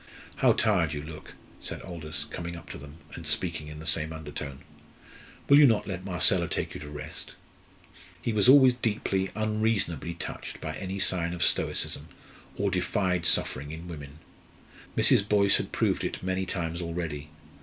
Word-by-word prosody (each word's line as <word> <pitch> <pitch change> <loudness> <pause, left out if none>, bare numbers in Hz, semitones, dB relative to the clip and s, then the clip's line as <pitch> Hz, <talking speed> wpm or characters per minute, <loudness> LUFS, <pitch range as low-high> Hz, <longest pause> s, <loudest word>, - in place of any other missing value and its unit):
"How - - +5
tired 85 -8 +2
you 75 -1 -4
look!" 75 0 -10 0.2
said - - -5
Aldous, 80 -5 -5
coming 85 +3 -6
up 85 - -9
to - - -7
them, 70 +1 -11 0.2
and 85 -2 -7
speaking 75 0 -1
in 75 0 -8
the 80 - -9
same 80 -1 +1
undertone. 75 -3 -6 0.9
"Will 140 +1 +8
you 145 - +9
not 110 -4 +2
let 95 -2 -4
Marcella 90 -3 +2
take - - -2
you - - -6
to 75 0 -8
rest?" 75 +2 -7 0.8
He 115 - -1
was 105 +2 +5
always 130 -2 +9
deeply, 105 -5 0
unreasonably 105 -7 0
touched - - -6
by 80 - -4
any 95 +3 -4
sign 90 -3 0
of 85 - -1
stoicism, - - 0 0.5
of - - +1
defied 90 -3 +1
suffering 70 +3 +1
in 80 +3 -7
women. 75 -3 -8 0.8
Mrs. 100 - +4
Boyce 100 -2 +5
had - - -4
proved - - +1
it - - -3
many 95 0 -1
times 85 -2 -2
already. 80 -3 -4
85 Hz, 165 wpm, -28 LUFS, 75-95 Hz, 0.9 s, you